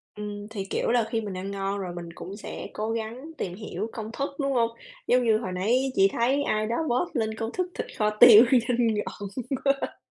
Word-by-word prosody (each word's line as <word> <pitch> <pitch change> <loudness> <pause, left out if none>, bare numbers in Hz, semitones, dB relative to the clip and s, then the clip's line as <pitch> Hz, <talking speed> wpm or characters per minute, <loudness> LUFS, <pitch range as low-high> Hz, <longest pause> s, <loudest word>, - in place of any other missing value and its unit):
Ừm, 205 0 -6
thì, 200 -3 -5
kiểu 195 - -1
là, 240 -1 +3
khi 225 -2 -1
mình 205 -3 -5
ăn 195 +2 -5
ngon 195 0 -2
rồi 180 -3 -4
mình 170 -1 -7
cũng 195 +3 -8
sẽ - - -7
cố 215 +1 -2
gắng 230 +7 -5
tìm 180 -1 -4
hiểu 210 0 -5
công 220 -1 -6
thức, 275 +3 -2
đúng 275 -1 0
hông? 230 -2 +2 0.4
Giống 250 0 +4
như 220 -2 +4
hồi 205 -5 -4
nãy 240 +9 +1
chị 195 0 +6
thấy 265 +5 +2
ai 215 0 0
đó 230 - -1
post 315 +8 0
lên 220 -2 0
công 225 0 -3
thức 365 +4 -1
thịt - - -4
kho 210 -1 +2
tiêu 240 -1 +10
nhìn 240 -2 +3
ngon 210 0 -4 0.4
quá. 275 0 0
225 Hz, 225 wpm, -26 LUFS, 205-245 Hz, 0.4 s, tiêu